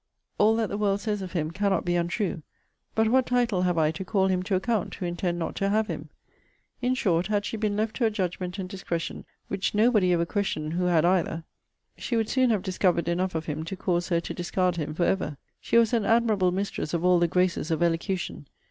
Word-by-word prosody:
All 220 +2 +5
that 225 -2 0
the 205 - -3
world 200 -1 +1
says 210 -1 -2
of 185 -2 -6
him 160 -3 -1
cannot 195 0 0
be 175 0 +1
untrue. 175 +1 -1 0.5
But 220 0 +3
what 260 +2 +3
title 240 -6 +1
have 180 -2 +1
I 155 -1 +3
to 160 +4 -6
call 190 0 +1
him 185 -1 +1
to 190 +1 -1
account, 195 +1 -1
who 185 - -5
intend 175 0 -2
not 165 - -3
to 195 - +1
have 215 +2 +2
him?' 155 -5 -6 0.7
In 250 +1 +1
short 180 -8 +1
had 205 -1 0
she 225 - -3
been 210 -2 -1
left 220 +1 -1
to 240 - +2
a - - +4
judgment 185 -2 -3
and 190 -2 -4
discretion, 180 -3 -4 0.2
which 195 +1 -2
nobody 210 -4 +4
ever 170 -1 +2
questioned 165 -5 -2
who 180 +1 0
had 170 -2 +3
either, 170 -2 +1 0.6
she 240 - -2
would 225 -1 0
soon 255 -1 +3
have 215 -5 +1
discovered 180 -3 +1
enough 180 +1 0
of 160 - -2
him 155 0 -3
to 165 +4 -5
cause 175 -1 -1
her 170 -2 +2
to - - -5
discard 180 0 0
him 155 -1 -3
for 170 - 0
ever. 175 -7 0 0.2
She - - +1
was 230 0 +4
an 230 -3 +2
admirable 215 -4 +3
mistress 185 -4 -2
of 170 +1 -1
all 180 -1 +5
the 175 - +3
graces 180 -2 +1
of 165 +1 +1
elocution. 170 -2 -2
185 Hz, 230 wpm, -26 LUFS, 170-210 Hz, 0.7 s, All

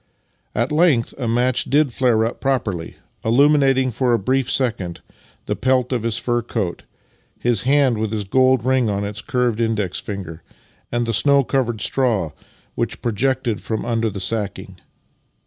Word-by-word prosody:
At 120 +6 0
length 150 -7 +3
a 125 - -2
match 125 +2 +2
did 145 -3 +2
flare 115 -4 +2
up 115 - -5
properly, 110 -11 -1 0.3
illuminating 135 +1 +3
for 120 +1 +1
a - - +4
brief 130 +5 0
second 100 -10 -1 0.4
the - - -1
pelt 130 -1 +1
of 125 -3 0
his 115 -1 -1
fur 120 -1 0
coat, 105 -7 -3 0.6
his 120 -4 0
hand 135 -5 +3
with 110 -1 -1
the 105 -1 -3
gold 130 +3 +3
ring 130 -3 +2
on 100 0 -1
its 105 +2 -5
curved 120 -3 0
index 110 -5 -1
finger, 90 -5 -7 0.5
and 120 0 0
the 115 - -2
snow 140 +5 +4
covered 120 -4 -1
straw 110 - +1 0.4
which - - -3
projected 120 0 0
from 110 -1 -3
under 115 -1 0
the 100 -1 -6
sacking. 100 -2 -3
120 Hz, 160 wpm, -20 LUFS, 105-130 Hz, 0.6 s, a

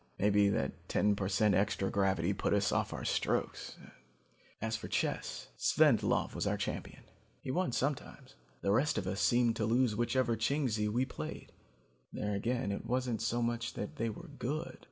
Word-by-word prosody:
Maybe 100 0 +4
that 70 -9 -2
ten 105 0 +3
per 95 -1 -2
cent 105 +1 +3
extra 95 0 +1
gravity 95 -2 +1
put 100 - +1
us 100 - +2
off - - 0
our - - -5
strokes. - - -1 0.8
As 110 +1 -1
for 115 - -5
chess, - - -2
Svendlov - - +3
was - - -2
our - - +1
champion. - - -5 0.4
He - - -4
won 180 0 0
sometimes. 135 +3 -3 0.3
The 100 - +1
rest 130 +9 +2
of 95 - -1
us 95 +2 -2
seemed 120 -1 +3
to 110 - 0
lose 120 -1 +3
whichever 120 +1 +1
Chingsi 115 -3 0
we 120 +5 +1
played. 75 - -7 0.6
There 105 0 -2
again 120 +2 -1
it 100 - -3
wasn't 125 -2 -1
so 120 0 0
much 120 0 -2
that 105 - -5
they 115 0 0
were 170 +10 -8
good. 150 +6 -3
110 Hz, 175 wpm, -33 LUFS, 100-125 Hz, 0.8 s, Maybe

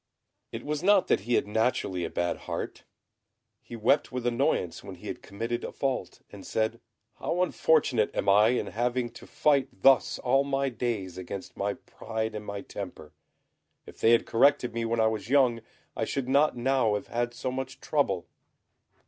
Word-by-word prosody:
It - - -6
was 150 0 -2
not 200 +1 +5
that - - +4
he 120 +4 0
had - - +2
naturally 105 -4 0
a 85 - -2
bad 85 0 -1
heart: - - -5 0.8
he 120 - -9
wept 115 +6 +2
with 125 -1 -4
annoyance 120 -8 0
when - - -8
he - - -15
had - - -5
committed 115 +4 -4
a - - -4
fault, 135 -2 -3
and - - -10
said, 110 +2 -1 0.4
"How 180 +2 0
unfortunate 145 -10 +2
am - - -1
I 105 +2 +6
in 125 +2 +1
having 120 +1 -1
to - - -13
fight 145 -3 +2 0.2
thus 135 -2 +5
all 135 +2 +2
my 140 0 0
days 110 -7 -3
against 95 +1 -7
my 100 0 -1
pride 110 0 -5
and 105 -1 -5
my 100 0 -4
temper! 90 -8 -8 0.7
If - - -13
they 115 - +5
had 115 - +4
corrected 125 +1 +3
me 115 0 -2
when 115 0 0
I 110 - +4
was 110 0 -1
young, 125 -4 +3 0.3
I - - -1
should 135 -2 -3
not 140 0 +3
now 120 -3 +2
have 105 - -3
had 120 0 -2
so 130 - -3
much 130 0 -5
trouble." 100 - 0
120 Hz, 180 wpm, -28 LUFS, 105-135 Hz, 0.8 s, I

